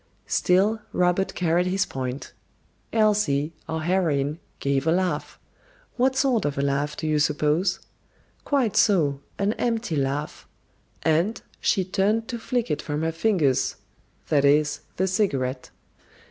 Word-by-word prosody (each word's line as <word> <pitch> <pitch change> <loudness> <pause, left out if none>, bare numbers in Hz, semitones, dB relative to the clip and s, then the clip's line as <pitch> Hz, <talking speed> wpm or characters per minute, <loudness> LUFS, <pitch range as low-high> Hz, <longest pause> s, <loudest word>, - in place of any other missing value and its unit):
Still, 200 +5 +2
Robert 180 +2 +1
carried 175 +1 +1
his 190 +1 +1
point. 130 0 -5 0.6
Elsie, 205 -9 +2 0.2
our 160 0 -2
heroine, 155 -4 0 0.2
gave 140 +1 0
a - - +4
laugh. 180 +1 -1 0.6
What 260 +1 +2
sort 265 -5 +2
of 145 -1 -2
a 140 - 0
laugh, 140 +1 -1
do - - -4
you 155 -1 +1
suppose? 150 +5 +1 0.6
Quite 265 -7 +1
so, 160 -10 +3 0.2
"an 200 +2 +1
empty 230 -7 -1
laugh," 140 +2 -2 0.6
and 165 +7 +1 0.2
"she 190 -4 +1
turned 210 +4 +1
to 235 -2 -4
flick 240 +1 -1
it 150 - -1
from 150 0 -3
her 165 - 0
fingers"; 165 - +1 0.5
that 145 -2 +3
is, 145 0 +3 0.2
the 190 - +2
cigarette. 140 - -1
170 Hz, 135 wpm, -25 LUFS, 145-205 Hz, 0.6 s, a